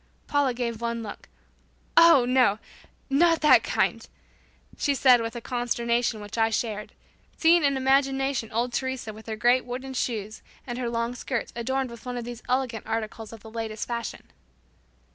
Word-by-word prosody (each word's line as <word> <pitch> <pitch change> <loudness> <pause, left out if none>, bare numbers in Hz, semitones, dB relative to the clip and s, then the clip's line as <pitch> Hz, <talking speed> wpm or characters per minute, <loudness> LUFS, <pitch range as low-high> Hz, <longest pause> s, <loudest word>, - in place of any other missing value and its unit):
Paula 285 -4 +1
gave 235 -2 -3
one 235 -1 -2
look, 205 - -9 0.7
"Oh, 335 -7 +7
no; 250 -5 +3 0.5
not 330 +4 +3
that 300 - +7
kind," - - -1 0.7
she 285 - 0
said 255 -3 +5
with 230 0 -4
a 235 - -5
consternation 235 -1 -1
which 205 +3 -6
I 225 0 +4
shared, 215 -2 -3 0.4
seeing 335 0 +5
in 280 -1 +2
imagination 270 -2 +1
old 240 +2 -1
Teresa 260 -4 -3
with 220 +2 -13
her 220 - -3
great 245 +4 +3
wooden 255 +2 -6
shoes 215 -4 -3 0.2
and 245 -1 -5
her 245 -2 -2
long 235 +1 -1
skirts 245 -1 -4
adorned 260 +2 -2
with 235 - -11
one 250 0 -3
of 240 - -5
these 240 -1 -7
elegant 250 -4 -1
articles 220 0 -4
of 225 -2 -11
the 220 - -12
latest 225 -1 -4
fashion. 235 -1 -4
240 Hz, 165 wpm, -26 LUFS, 225-265 Hz, 0.7 s, Oh